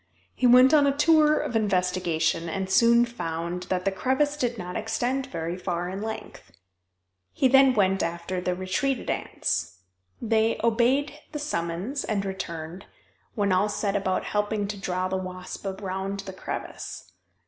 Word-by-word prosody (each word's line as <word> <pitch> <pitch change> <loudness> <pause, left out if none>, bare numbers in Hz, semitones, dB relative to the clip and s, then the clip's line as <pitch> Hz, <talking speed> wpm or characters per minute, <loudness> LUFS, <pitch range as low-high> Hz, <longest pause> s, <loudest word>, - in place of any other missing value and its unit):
He 255 - +2
went 255 +3 +7
on 290 -2 +6
a 280 0 +1
tour 305 0 +5
of 235 - -3
investigation, 180 -5 0
and 190 +3 -3
soon 235 +3 +5
found 175 -5 -4
that 180 -1 -1
the 195 - +2
crevice 265 +8 0
did 245 -5 -1
not 180 -2 -6
extend 245 +5 -1
very 170 -9 -4
far 180 -1 -3
in 190 +2 -5
length. 220 - -7 0.8
He 265 - +3
then 270 0 +6
went 195 -2 +2
after 170 +2 -3
the 180 0 -1
retreated 190 +9 -1
ants. 90 - -2 0.4
They 225 0 +1
obeyed 255 +6 +2
the - - -2
summons 225 - -3
and 200 -2 -1
returned, 170 -2 -6 0.5
when 200 -3 +1
all 185 +3 +3
set 205 -1 -1
about 190 -2 0
helping 210 0 -1
to 210 - -3
draw 185 0 -1
the 190 0 -1
wasp 185 +1 -6
around 195 0 -4
the 195 -1 -8
crevice. 190 - -7
200 Hz, 155 wpm, -26 LUFS, 180-240 Hz, 0.8 s, went